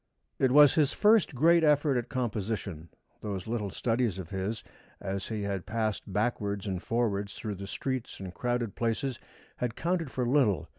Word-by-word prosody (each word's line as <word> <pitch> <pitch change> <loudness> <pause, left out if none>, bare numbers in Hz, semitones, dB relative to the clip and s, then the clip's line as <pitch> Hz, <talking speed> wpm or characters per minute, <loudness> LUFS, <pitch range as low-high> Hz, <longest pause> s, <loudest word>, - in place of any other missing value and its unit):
It 130 - +4
was 145 +1 +8
his 150 -4 +2
first 210 -8 +4
great 165 +5 +5
effort 150 -2 +4
at 120 -1 -1
composition. 105 - -3 0.3
Those 100 -3 -4
little 110 -3 -2
studies 115 -1 0
of 95 -2 -7
his, 100 +3 -3 0.4
as 95 0 -4
he 110 -2 -3
had 100 -2 -3
passed 110 -3 -2
backwards 105 -1 -1
and 95 -3 -2
forwards 100 -4 -1
through 110 -2 -4
the 100 0 -7
streets 130 +4 -4
and 95 -2 -7
crowded 120 -2 -1
places, 120 +2 -1 0.4
had 120 -2 -2
counted 170 -3 -1
for 125 -1 -2
little. 125 -8 +2
115 Hz, 165 wpm, -29 LUFS, 100-130 Hz, 0.4 s, was